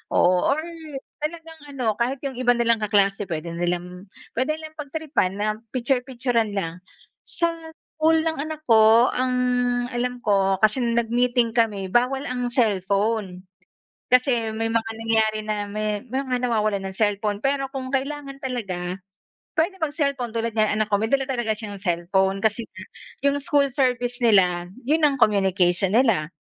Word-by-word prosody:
Oo, 180 0 +4
or 310 - -3 0.6
talagang 320 +1 -6 0.2
ano, 255 -3 -3
kahit 260 +4 -1
'yong 265 -2 -4
iba 245 -1 +3
nilang 235 -1 +2
kaklase 200 -2 +1
puwede 165 0 -4
nilang 175 +2 -3 0.2
puwede 270 +6 0
nilang 315 0 -11
pagtripan 295 - -1
na 205 +1 -1 0.3
piktyur-piktyuran 245 -3 0
lang. 180 -2 -3 0.5
Sa 335 -1 0 0.5
school 320 0 +4
ng 320 -3 -2
anak 310 +1 -5
ko, 225 -1 +6
ang 255 0 0 0.6
alam 245 0 -3
ko, 195 -2 +3
kasi 215 +4 +4
nag-meeting 235 0 +1
kami, 210 -5 0
bawal 255 +4 +2
ang 250 -2 -2
cellphone. 200 -4 0 0.7
Kasi 250 -3 +3
may 225 +1 -2
mga 225 0 -1
nangyayari 220 -1 0
na 210 -1 -1
may 210 -1 -2
mga 255 0 -2
nawawalan 215 -4 +1
ng 190 - -4
cellphone. 205 -1 0
Pero 275 +1 -1
kung 260 -2 -5
kailangan 275 0 -4
talaga, 190 -8 -4 0.6
puwede 345 +3 0
mag-cellphone. 280 -5 -1
Tulad 230 0 -2
niyan 215 -1 +1
anak 215 - +2
ko, 205 - +3
may 220 - 0
dala 275 -1 +2
talaga 240 -5 -1
siyang 205 -3 -7
cellphone 190 +2 +1
kasi 220 +3 0
nga 185 -2 -11 0.4
'yong 280 0 +2
school 280 0 +2
service 245 -2 0
nila 180 -6 +3 0.2
'yon 310 +5 +2
ang 290 -3 +3
communication 190 -4 +2
nila. 220 - +2
230 Hz, 150 wpm, -23 LUFS, 205-265 Hz, 0.7 s, ko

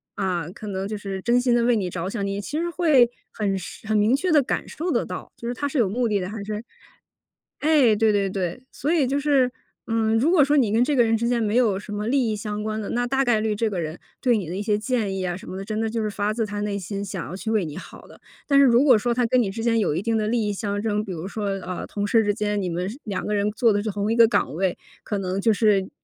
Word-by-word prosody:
啊， 180 -5 -1
可 210 +2 -9
能 195 0 -3
就 215 - -4
是 195 -2 -5
真 240 +4 +3
心 245 -1 +2
地 240 - +3
为 240 0 +3
你 195 -5 -1
着 175 +1 -4
想， 200 -1 -3
你 200 0 -2
其 290 +9 -4
实 340 +2 -1
会 310 -9 +4 0.2
很 200 -3 -1
是 190 +3 -9
很 215 - +2
明 210 +5 +4
确 350 +5 0
地 300 -2 +6
感 255 - -2
受 335 +4 -4
得 - - +1
到， - - -7
就 - - -10
是 240 - -1
他 285 +3 -2
是 285 - -3
有 225 -6 +3
目 240 +4 0
的 210 -2 +1
的 185 - -4
还 215 -1 -6
是 210 +1 -5 1.0
哎， 290 -8 +4
对 220 0 +3
对 200 -1 +1
对。 185 +3 -3
所 290 +5 -2
以 295 -6 +3
就 275 +2 0
是， 275 -3 +2 0.4
嗯， 225 -1 +1
如 290 +8 +3
果 315 -6 +6
说 290 +2 +2
你 235 -7 +3
跟 225 +3 +3
这 285 +3 +1
个 250 - +5
人 225 -1 +2
之 235 - -1
间 240 -1 +1
没 210 +2 0
有 215 -6 +3
什 210 - -10
么 210 +1 -3
利 250 -2 +2
益 - - -1
相 210 0 -4
关 215 0 -2
的， 200 - -5
那 245 +1 0
大 270 +2 +1
概 240 -3 +3
率 215 -1 0
这 225 +2 0
个 185 -4 -3
人 155 +1 -5 0.2
对 245 -4 +3
你 190 - -4
的 180 - -4
一 200 - -3
些 210 -1 +1
建 215 -3 -1
议 185 - -2
啊 175 -1 -2
什 - - -11
么 185 - -6
的， 195 - -6
真 215 +1 -3
的 225 - 0
就 225 0 -2
是 215 - -1
发 205 +1 -1
自 225 0 -1
他 205 0 -4
内 205 -1 -2
心 200 +2 -5
想 185 -2 -5
要 180 - -6
去 220 +3 -5
为 215 -5 +1
你 150 -2 -7
好 - - -11
的。 - - -17 0.3
但 280 -1 +5
是 280 - +7
如 245 0 +5
果 270 -4 +7
说 240 +3 -1
他 245 0 +1
跟 250 +2 +3
你 200 - 0
之 225 +3 -5
间 230 -1 +2
有 175 -8 +1
一 170 - -1
定 230 +1 0
的 215 - 0
利 225 -1 0
益 205 - -1
相 205 0 -3
争， 210 -1 0
比 190 - -6
如 170 +2 -5
说， 210 +1 -4
呃， 185 -2 -4
同 205 0 -3
事 225 +1 +4
之 205 - +1
间， 210 -1 -1
你 185 - -2
们 175 +2 -2
是 245 +7 -9
两 200 -4 -4
个 210 - -1
人 205 +1 +1
做 225 0 +3
的 205 - +1
是 220 - -2
同 205 +2 -1
一 - - +1
个 230 -1 +7
岗 145 - 0
位， 185 0 0 0.3
可 205 - -3
能 190 +1 -2
就 225 - +3
是 205 -3 +2
215 Hz, 325 characters per minute, -24 LUFS, 200-240 Hz, 1.0 s, 是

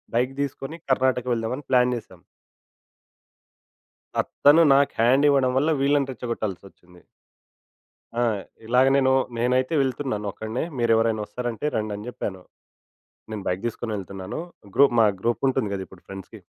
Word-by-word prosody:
Bike 125 +3 +1
తీసుకొని, 140 +2 -4 0.2
కర్ణాటక 130 -1 +2
వెళ్దామని 120 +5 -3
plan 125 -1 +4
చేసాం. 95 -6 -12 2.0
ఆ! - - +6 0.3
తను 155 +4 +8
నాకు 140 +1 +3
హ్యాండ్ 130 +5 +4
ఇవ్వడం 135 -2 +3
వల్ల, 150 +4 +2
వీళ్ళని 140 -1 +2
రెచ్చగొట్టాసొచ్చింది. 95 -7 -6 1.2
ఆ! - - +2 0.4
ఇలాగ 125 +3 +4
నేను 130 -1 +3 0.3
నేనైతే 125 +5 +1
వెళ్తున్నాను 130 -5 -2
ఒక్కడినే. 110 +7 -4
మీరు 120 -1 +1
ఎవరైనా 110 -1 +1
వస్తారంటే, 120 +3 -4
రండని 105 0 -3
జెప్పాను. 95 -6 -5 0.9
నేను 105 -2 -5
బైక్ 90 +3 -2
తీసుకొని 115 -1 -4
వెళ్తున్నాను. 95 - -6 0.4
గ్రూప్ 140 -3 +5
మా 110 - +6
గ్రూప్ 120 +2 0
ఉంటుంది 130 -6 -1
గదా! 95 -1 -4
ఇప్పుడు 95 - -17
ఫ్రెండ్స్‌కి. 95 -1 -10
120 Hz, 130 wpm, -24 LUFS, 105-130 Hz, 2.0 s, తను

